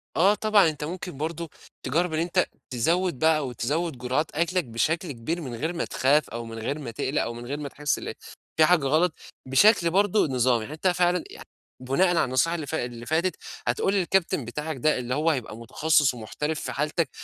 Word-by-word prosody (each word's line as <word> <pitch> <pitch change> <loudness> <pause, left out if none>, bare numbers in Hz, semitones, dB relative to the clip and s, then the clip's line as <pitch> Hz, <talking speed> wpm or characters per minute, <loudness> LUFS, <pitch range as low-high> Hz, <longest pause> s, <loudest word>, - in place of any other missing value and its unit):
آه 195 +5 +5
طبعًا، 210 -6 +4
أنت 150 -1 -6
ممكن 175 -1 -6
برضه 165 +2 -4 0.4
تجرب 165 +6 0
إن 155 - 0
أنت 170 +1 +1 0.2
تزود 165 +4 0
بقى 160 -1 +4
أو 135 -4 -3
تزود 145 +5 -2
جُرعات 125 +5 -1
أكلك 175 +2 +1
بشكل 155 +8 -1
كبير 155 +8 -3
من 125 -6 -6
غير 160 +9 -2
ما 170 - -2
تخاف 145 +3 +2
أو 115 0 -5
من 115 0 -7
غير 140 +7 -3
ما 130 -6 -6
تقلق 130 +6 -1
أو 120 - -3
من 120 +1 -8
غير 140 +4 -4
ما 145 -1 -5
تحس 145 +1 -1
ال - - -5 0.5
في 155 - +8
حاجة 165 -4 +3
غلط، 155 +5 +2 0.3
بشكل 170 - +5
برضه 205 +3 +3
نظامي، 125 -4 +1
حتى 160 +5 0
فعلًا 180 -1 +2
يع - - -11 0.4
بُناءً 135 +9 +2
على 175 -1 +2
النصيحة 130 +7 +1
اللي 155 -4 -5
فا 160 -6 -2
اللي 120 -1 -8
فاتت، 170 +5 0 0.3
هتقول 125 +11 +1
للكابتن 180 - +1
بتاعك 150 +5 -4
ده 150 +3 +2
اللي 125 +1 -2
هو 155 +3 +2
هيبقى 125 -7 -2
متخصص 150 +5 +2
ومحترف 150 +7 -4
في - - -4
حالتك، 150 +3 -1
155 Hz, 200 wpm, -26 LUFS, 130-170 Hz, 0.5 s, في